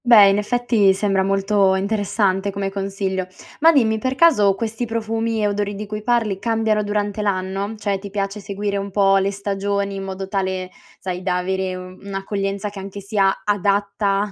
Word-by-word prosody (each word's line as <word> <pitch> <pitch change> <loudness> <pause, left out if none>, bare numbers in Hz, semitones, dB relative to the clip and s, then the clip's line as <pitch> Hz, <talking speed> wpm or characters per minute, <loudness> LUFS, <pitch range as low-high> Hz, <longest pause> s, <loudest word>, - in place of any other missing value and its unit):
Beh, 215 -5 +8
in 195 +1 +2
effetti, 220 -3 +2
sembra 195 -1 +1
molto 195 0 +2
interessante 200 -1 0
come 195 0 -3
consiglio. 195 -1 -2 0.3
Ma 325 +2 +7
dimmi: 225 -7 +2
per 260 +3 -1
caso 210 -11 +5
questi 225 +3 -3
profumi 225 0 -1
e - - +3
odori 205 0 -2
di 210 +2 -5
cui 210 +1 -5
parli 225 -4 +1
cambiano 220 0 +1
durante 205 0 -2
l'anno? 195 +1 -2
Cioè, 205 -2 -1
ti 200 +1 -8
piace 200 +1 -3
seguire 200 0 -3
un 200 0 -3
po' 195 0 +4
le 195 0 +1
stagioni 200 0 -2
in 195 - -5
modo 190 0 -5
tale, 190 -2 -2 0.3
sai, 180 -1 -4
da 180 -1 0
avere 190 0 -2
un'accoglienza 195 +2 -4
che 195 -1 -7
sia 200 0 +1
anche 195 - +2
adatta 200 0 +1
200 Hz, 170 wpm, -21 LUFS, 195-210 Hz, 0.3 s, Beh